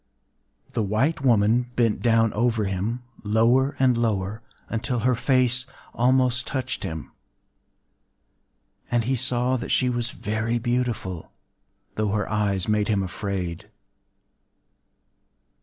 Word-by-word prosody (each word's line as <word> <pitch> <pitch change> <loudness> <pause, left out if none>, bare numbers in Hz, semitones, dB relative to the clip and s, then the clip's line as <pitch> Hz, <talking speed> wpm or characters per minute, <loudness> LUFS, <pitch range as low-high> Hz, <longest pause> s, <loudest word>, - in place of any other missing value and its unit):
The - - 0
white 110 +10 0
woman 120 0 +3
bent 115 -3 +1
down 115 -2 +3
over 115 -1 +1
him, 100 +6 -2 0.2
lower 115 +6 +3
and 130 -2 +3
lower, 110 -2 -1 0.3
until 120 +1 -2
her 125 +2 +3
face 125 0 +2 0.3
almost 130 0 +2
touched 130 -2 -3
him; 80 -6 -5 1.8
and 120 -1 +1
he 130 +4 0
saw 125 +1 +1
that - - -6
she 125 -1 +2
was 120 -1 -1
very 110 +2 -2
beautiful,—though 110 -3 -4
her 105 0 -1
eyes 100 -4 0
made 105 -1 +1
him 100 -3 +1
afraid. 95 0 -4
115 Hz, 110 wpm, -24 LUFS, 105-125 Hz, 1.8 s, woman